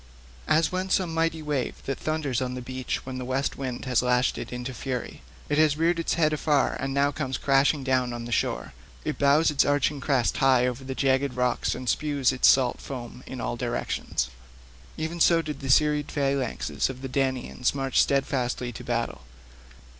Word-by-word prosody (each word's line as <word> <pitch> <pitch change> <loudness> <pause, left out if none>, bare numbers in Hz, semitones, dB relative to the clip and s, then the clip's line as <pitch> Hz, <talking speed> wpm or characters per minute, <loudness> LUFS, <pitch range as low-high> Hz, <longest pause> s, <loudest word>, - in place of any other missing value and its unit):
As 160 0 +3
when 185 +1 -2
some 180 -3 +1
mighty 165 -1 0
wave 145 -4 -2
that 135 - -3
thunders 150 -5 -1
on 125 -1 -2
the 125 - -5
beach 130 0 -4
when 130 -1 -5
the - - -4
west 130 +2 -1
wind 130 -2 -5
has 125 -2 +2
lashed 125 0 +1
it - - -6
into 125 +1 -5
fury—it 130 +4 -5
has 155 -2 +4
reared 170 +1 +2
its 165 - 0
head 155 -2 +2
afar 150 -2 +1
and 135 +1 -2
now 140 +1 +2
comes 135 -3 -3
crashing 140 +1 +2
down 130 -2 +1
on 120 -1 -5
the 120 - -7
shore; - - -1 0.3
it - - -3
bows 145 +3 +4
its 145 - +3
arching 145 0 +1
crest 130 -3 +1
high 130 -2 +4
over 125 +1 -3
the 130 0 -5
jagged 135 -1 +1
rocks 125 -1 0
and 130 - -7
spews 140 0 +1
its 130 - +3
salt 130 -2 +4
foam 125 -2 -7
in 130 - -6
all 120 - -2
directions—even 65 - -5
so 170 0 +5
did 150 -1 -5
the 135 - -6
serried 150 +2 +3
phalanxes 140 -3 -1
of 130 0 -8
the - - -2
Danaans 130 -1 -1
march 135 -2 +2
steadfastly 130 -3 0
to 110 - -9
battle. 115 - -2
135 Hz, 185 wpm, -26 LUFS, 125-145 Hz, 0.3 s, so